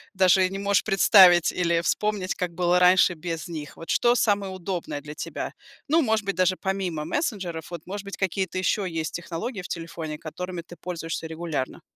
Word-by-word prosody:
даже 185 0 +4
не 195 - -5
можешь 200 -2 +2
представить 185 -3 +6
или 170 -2 +1
вспомнить, 205 0 0
как 180 -2 -3
было 180 0 +3
раньше 180 0 +5
без 165 0 -5
них? 155 -4 -7
Вот 165 - -10
что 240 0 +3
самое 200 -4 +1
удобное 180 -5 -4
для 150 +1 -8
тебя? - - -5 0.3
Ну, 320 +3 +4
может 220 -6 +1
быть, 200 - -1
даже 185 0 +2
помимо 190 -6 -2
мессенджеров, 185 - -3
вот, 170 -3 -6
может 200 +2 -6
быть, 200 - -7
какие-то 190 -1 -1
еще 185 +1 0
есть 160 -1 -3
технологии 180 +6 -5
в 180 - -8
телефоне, 165 -2 -5
которыми 180 +3 -6
ты 175 - -12
пользуешься 165 -2 -4
регулярно? 160 -4 -4
180 Hz, 180 wpm, -25 LUFS, 165-195 Hz, 0.3 s, представить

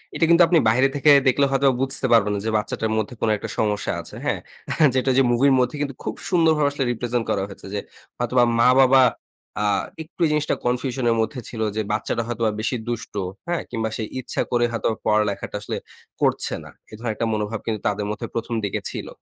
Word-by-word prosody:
এটা 165 - +3
কিন্তু 170 +1 +7
আপনি 170 -1 +4
বাইরে 130 +4 +4
থেকে 145 +1 +5 0.2
দেখলে 140 +2 +4
হয়তো 135 0 +3
বুঝতে 135 0 +2
পারবেন, 105 -2 +4
না - - -2
যে - - 0
বাচ্চাটার 110 +1 -2
মধ্যে 110 +3 -2
কোন 115 - +2
একটা - - -7
সমস্যা 105 -2 0
আছে। - - -10
হ্যাঁ? - - 0 0.6
যেটা 130 +1 +2
যে - - +6
মুভির 135 +3 +4
মধ্যে 125 +4 +1
কিন্তু 140 -3 -3
খুব - - -3 0.2
সুন্দরভাবে 160 -5 +3
আসলে 140 -1 -2
রিপ্রেজেন্ট 120 0 -2
করা 100 - +1
হয়েছে 100 -1 -11
যে 100 - -1 0.4
হয়তোবা 120 +1 +2 0.2
মা 120 - +6
বাবা 130 0 +6 0.6
আ - - +1 0.4
একটু 170 +2 -5
জিনিসটা 150 0 +1
কনফিউশন 125 +1 -1
এর 115 - +3
মধ্যে 125 +3 -3
ছিল, 110 -2 -6
যে 110 - 0
বাচ্চাটা 110 +2 -1
হয়তোবা 115 -2 0
বেশি 120 +3 -1
দুষ্ট, 120 -1 -4 0.3
হ্যাঁ? 175 -1 -1
কিংবা 110 -2 -2
সে 110 - -3 0.2
ইচ্ছা 130 - -3
করে 120 -1 +3
হয়তো 115 -2 -1 0.2
পড়ালেখাটা 105 -1 0
আসলে - - -4 0.4
করছে - - +1
না। - - -12 0.2
এ - - -15
ধরনের 115 -1 -3
একটা 115 - -1
মনোভাব 105 +1 -2
কিন্তু 110 -2 -2
তাদের 105 0 -1
মধ্যে 105 - -5
প্রথম 115 0 -2
দিকে 100 - -2
ছিল। - - -6
120 Hz, 205 wpm, -23 LUFS, 110-135 Hz, 0.6 s, কিন্তু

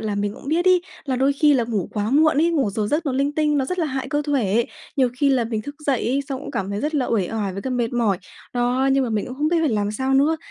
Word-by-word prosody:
là 215 -2 -2
mình 205 0 -2
cũng - - -10
biết 330 +4 +1
ấy 365 -1 +4 0.2
là 260 -3 -1
đôi 270 +2 +3
khi 295 +1 +4
là 245 -3 +2
ngủ 215 -6 -2
quá 210 0 -1
muộn 305 +2 +4
ấy, 330 +3 +3
ngủ 280 -10 +1
giờ 210 +1 -2
giấc 300 +8 -1
nó 275 - 0
linh 275 +2 0
tinh, 300 -1 +1
nó 270 - +1
rất 365 +7 -4
là 330 - +1
hại 265 -2 -3
cơ 295 0 0
thể. 235 -6 +1 0.3
Nhiều 260 -2 +3
khi 280 +1 +3
là 255 -3 +2
mình 220 -2 -3
thức 285 - -7
dậy 270 -4 +1
ấy, 270 +3 +1
xong 265 -2 -4
cũng - - -7
cảm 195 0 -3
thấy 200 +1 -3
rất 305 +2 -2
là 270 -4 +1
uể 200 -6 0
oải 210 -4 -2
với 195 +2 -6
cả 260 - -3
mệt 240 -2 -1
mỏi. 225 -6 +1 0.4
Đó, 250 +2 +1
nhưng 270 0 +2
mà 240 - -3
mình 215 -2 -1
cũng 250 - -7
không 300 +2 +1
biết 340 - +2
phải 320 - +2
làm 205 -4 0
sao 260 +5 -1
nữa. 290 +4 +3
265 Hz, 315 wpm, -22 LUFS, 220-290 Hz, 0.4 s, ấy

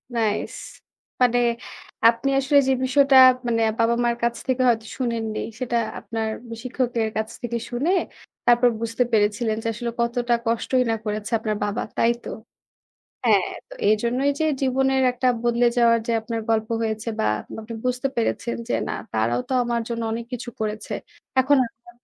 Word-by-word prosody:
Nice! 215 -2 0 0.7
মানে 245 -1 +4 0.7
আপনি 235 +4 -1
আসলে 280 +2 +3
যে 265 - +4
বিষয়টা 275 +1 +4 0.3
মানে 230 -1 +1 0.2
বাবা-মার 235 +1 +2
কাছ 235 0 +1
থেকে 260 0 +1
হয়তো 225 -2 +1
শুনেননি। 230 -4 -2 0.2
সেটা 240 -2 -1 0.2
আপনার 225 -1 -3 0.2
বি 230 - -5
শিক্ষকদের 245 -3 -1
কাছ 220 0 -1
থেকে 235 -1 -2
শুনে 260 +8 0 0.5
তারপর 240 0 +5
বুঝতে 230 +2 0
পেরেছিলেন 215 +1 +2
যে - - -2
আসলে 235 +1 -4
কতটা 240 0 0
কষ্টই 235 +3 +1
না - - +1
করেছে 210 +1 -3
আপনার 215 -1 -2
বাবা। 205 +3 -2
তাই 230 - +4
তো? - - -6 1.0
হ্যাঁ, - - +4 0.2
তো - - -10
এইজন্যই 235 +6 +2
যে - - +3 0.2
জীবনের 265 0 +2
একটা 250 +1 -2 0.2
বদলে 240 0 +2
যাওয়ার 235 -1 +5
যে 235 - 0
আপনার 225 0 -4
গল্প 220 -1 +1
হয়েছে 220 0 -2
বা - - +1 0.3
পা - - -7
আপনি 230 +1 -8
বুঝতে 250 +2 0
পেরেছেন 235 0 -1
যে - - 0
"না, - - -2 0.2
তারাও 115 +2 +1
তো - - -3
আমার 235 -1 0
জন্য 230 -1 -3
অনেক 230 +1 -4
কিছু 245 0 -5
করেছে।" 215 0 -3 0.5
এখন 280 +2 +4
আমা 235 +1 -16
235 Hz, 165 wpm, -23 LUFS, 225-250 Hz, 1.0 s, তারপর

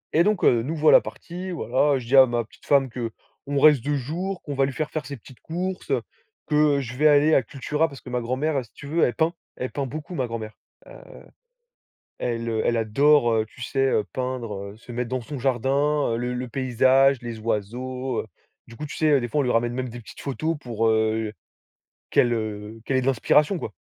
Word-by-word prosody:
et 170 - +6
donc 210 -2 +1
heu, 120 -2 +5
nous 155 +6 -3
voilà 155 0 +6
partis, 180 +2 -8
voilà 140 -2 +1
je 120 - -9
dis 135 - +2
à 130 - +10
ma 120 -1 -1
petite - - -21
femme 140 -2 +4
qu'on 125 +4 -5
reste 150 -4 +6
2 145 +1 0
jours, 175 +8 -3
qu'on 145 - -5
va 135 0 +3
lui 140 - -3
faire 155 +1 -3
faire 155 -2 -3
ses 140 -2 -6
petites 120 +1 -16
courses, 180 +3 -4 0.6
que 150 -2 +3
je 125 -1 -7
vais 150 +3 +4
aller 150 +1 +5
à - - +5
Cultura, 150 +6 -1
parce 140 -3 -11
que 125 - -10
ma 125 0 -1
grand-mère, 135 +4 -1
si - - -25
tu - - -12
veux, 165 +3 +1
elle 120 - +2
peint, 165 +1 +1 0.2
elle 125 - -4
peint 140 -2 -3
beaucoup 155 +6 -7
ma 130 -4 -1
grand-mère. 110 -2 -6 0.3
Heu, - - -13 1.2
elle 115 -1 -2 0.2
elle 120 - +2
adore, 120 +3 +4
heu, 110 -1 +1
tu 115 - -16
sais, 135 +1 0 0.2
peindre, 115 -6 -4
se 120 - -12
mettre 120 0 -3
dans 130 -1 -2
son 140 +4 -7
jardin, 135 +2 +1
heu, - - -1
le 125 +1 -2
le 125 +1 -4
paysage, 130 +2 +3
les 120 -2 -6
oiseaux. 120 +4 -3 0.4
Du 115 - -12
coup, 150 - -6
tu - - -8
sais, 150 -3 +3
des 120 - -2
fois, 145 +5 0
on - - 0
lui 125 - +1
ramène 120 +1 +1
même 130 0 -3
des 120 +1 -8
petites 105 - -12
photos 155 +4 -2
pour, 115 -4 -1
heu, 110 0 +1 0.8
qu'elle, 120 - +4
heu, 110 -1 -4
qu'elle 135 - -1
ait 130 - +2
de 125 - -2
l'inspiration, 150 - +3
quoi - - -6
130 Hz, 215 wpm, -24 LUFS, 120-145 Hz, 1.2 s, à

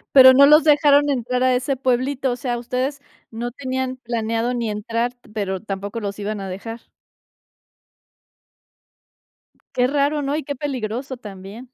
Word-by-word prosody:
¿Pero 260 -1 +10
no 280 +2 +7
los 300 +2 +7
dejaron 290 -1 +4
entrar 250 -1 -1
a 255 -1 +3
ese 265 +2 -1
pueblito? 260 +1 0
O 245 - -2
sea, 245 -1 -2
ustedes 255 +4 -3 0.3
no 235 +2 -4
tenían 260 0 -3
planeado 230 0 -2
ni 230 -3 -2
entrar, 230 +3 -2
t 245 0 -24
pero 190 -3 -2
tampoco 200 +2 -5
los 200 -2 -4
iban 205 0 -3
a 195 - -5
dejar. 225 +5 -7 2.9
Qué 250 0 +2
raro, 290 +1 +1
¿no? 280 +2 -1
Y 310 - -4
qué 285 - -4
peligroso 260 -1 -4
también. 200 +1 -10
250 Hz, 155 wpm, -21 LUFS, 225-270 Hz, 2.9 s, Pero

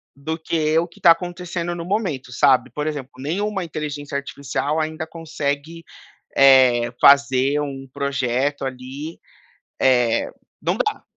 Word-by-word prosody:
do 160 +4 -4
que 160 -1 0
o 170 - 0
que 170 - -20
está 170 - +7
acontecendo 175 0 -2
no 170 -1 -6
momento, 175 - -2
sabe. 130 -1 +3
Por 150 0 -4
exemplo, 140 -3 -4
nenhuma 190 +8 -2
inteligência 150 -3 -5
artificial 140 +2 -3
ainda 155 +1 -4
consegue, 160 0 -4 0.5
eh, 130 -3 +6
fazer 140 0 +5
um 135 -2 -5
projeto, 140 0 -1
ali. 135 +5 -6 0.6
Eh, 125 -3 +3 0.3
não - - 0
dá. 425 -3 -1
145 Hz, 130 wpm, -21 LUFS, 135-165 Hz, 0.6 s, está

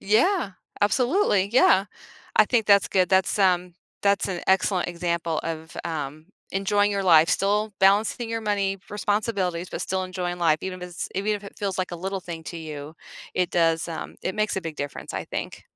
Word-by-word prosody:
Yeah. 225 - +2 0.3
Absolutely, 240 - +2
yeah. 195 -6 +5 0.5
I - - +7
think 235 -3 +2
that's 200 -1 +5
good, 185 -2 +2
that's, 190 +2 +3
um, 180 -2 +2 0.3
that's 200 0 +2
an 180 -2 -3
excellent 190 -1 +2
example 170 -2 -2
of, 160 0 -6
um, 155 -1 -5 0.3
enjoying 205 +1 +2
your 200 -1 -1
life, 165 -3 +6
still 205 +1 +1
balancing 210 +4 +3
your 230 0 -2
money, 200 -2 0
responsibilities, 205 -4 -1
but - - -4
still 190 0 -1
enjoying 180 -1 -4
life, 165 -3 +3
even 185 -1 -5
if 180 - -6
it's 175 - -5
even 200 +3 0
if 205 - -6
it 200 - -11
feels 195 -3 -2
like 185 - -1
a 175 - -3
little 190 +3 -3
thing 170 -2 -7
to 170 - -6
you, 155 -2 -7 0.4
it 180 -1 +1
does 165 -2 +2
um, 165 - -6
it 185 - -2
makes 215 -1 0
a 190 - 0
big 165 -2 -6
difference, 145 0 -6
I - - -3
think. - - -5
190 Hz, 190 wpm, -25 LUFS, 170-205 Hz, 0.5 s, I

